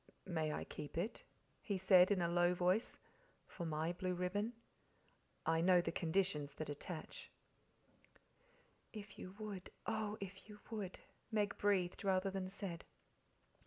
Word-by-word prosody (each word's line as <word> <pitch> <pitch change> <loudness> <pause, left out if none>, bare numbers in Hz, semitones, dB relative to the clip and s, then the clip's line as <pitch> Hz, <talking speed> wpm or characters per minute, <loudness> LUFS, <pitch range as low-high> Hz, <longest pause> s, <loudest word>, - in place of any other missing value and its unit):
"May 160 -4 0
I - - -2
keep 145 +1 -7
it?" 195 +7 -1 0.4
he 200 -3 -1
said 185 -1 +7
in 195 -4 +3
a - - +3
low 175 +1 +4
voice. 180 +5 +2 0.5
"For 170 -3 -5
my 160 +2 0
blue 180 0 -1
ribbon? 205 +6 0 0.9
I 160 0 +3
know 180 +1 +7
the 175 - 0
conditions 160 -5 +1
that 155 -1 -3
attach." 155 +3 -6 1.6
"If 205 -2 -9
you 185 +1 -7
would 210 -4 -5 0.2
oh, 215 -1 -1
if 195 +1 -7
you 210 0 -10
would!" 205 -5 -4 0.3
Meg 210 -2 +1
breathed 195 -2 +2
rather 190 0 +2
than 190 -1 -2
said. 185 -3 -4
185 Hz, 140 wpm, -39 LUFS, 175-200 Hz, 1.6 s, said